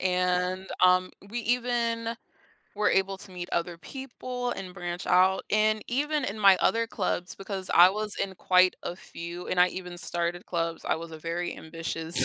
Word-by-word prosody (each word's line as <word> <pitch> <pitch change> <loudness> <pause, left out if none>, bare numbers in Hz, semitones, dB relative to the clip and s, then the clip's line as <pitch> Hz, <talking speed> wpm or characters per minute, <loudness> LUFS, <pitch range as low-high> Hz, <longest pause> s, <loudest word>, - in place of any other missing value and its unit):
and, 180 0 0 0.2
um, 185 0 +4 0.2
we 235 - -4
even 235 -1 0 0.6
were 210 0 +2
able 195 0 +1
to 190 - -11
meet 180 -1 -6
other 170 0 -1
people 250 0 -5
and 185 -5 -6
branch 175 0 -5
out 190 +1 +4
and 215 0 +3
even 295 +3 0
in 210 -2 -4
my 195 -2 +7
other 230 0 +2
clubs 180 -5 -2
because 195 -1 -5
I 175 +1 +9
was 210 +1 -3
in 190 -1 -2
quite 185 0 +4
a 175 - -4
few 170 0 -8
and 180 - +1
I 180 - +7
even 180 -1 -7
started 175 0 -2
clubs. 165 -1 -2
I - - +1
was 165 0 -8
a 160 - -8
very 170 +2 -3
ambitious 165 0 -3
185 Hz, 175 wpm, -28 LUFS, 175-215 Hz, 0.6 s, I